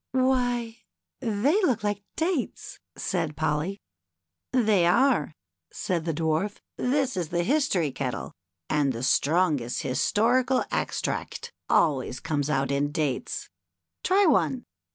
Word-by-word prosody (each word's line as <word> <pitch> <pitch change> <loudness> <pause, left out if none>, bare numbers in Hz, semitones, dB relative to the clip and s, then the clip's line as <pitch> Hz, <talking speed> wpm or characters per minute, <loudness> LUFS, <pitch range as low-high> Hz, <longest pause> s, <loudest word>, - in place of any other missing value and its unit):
" - - -60
Why, 245 -3 +1 0.4
they 265 - +1
look 245 - +1
like 205 -1 -1
dates! 330 -5 -2
" - - -59
said 165 -5 -2
Polly. 160 +6 -1 0.4
" - - -60
They 215 -8 +3
are," 240 - +3 0.4
said 170 -3 -2
the 165 - 0
Dwarf; 160 +6 0 0.2
" - - -60
this 265 -1 0
is 175 -4 -2
the 175 0 0
History 195 - +1
kettle, 130 -2 -4 0.3
and 145 -3 +1
the 115 +1 -5
strongest 145 -3 +1
historical 245 - +2
extract - - -3 0.2
always 135 -5 +2
comes 145 -2 -1
out 135 -1 +1
in 140 +1 0
dates. 150 -5 -2 0.5
Try 395 +2 +4
one." 165 - +2
180 Hz, 130 wpm, -26 LUFS, 150-250 Hz, 0.5 s, Try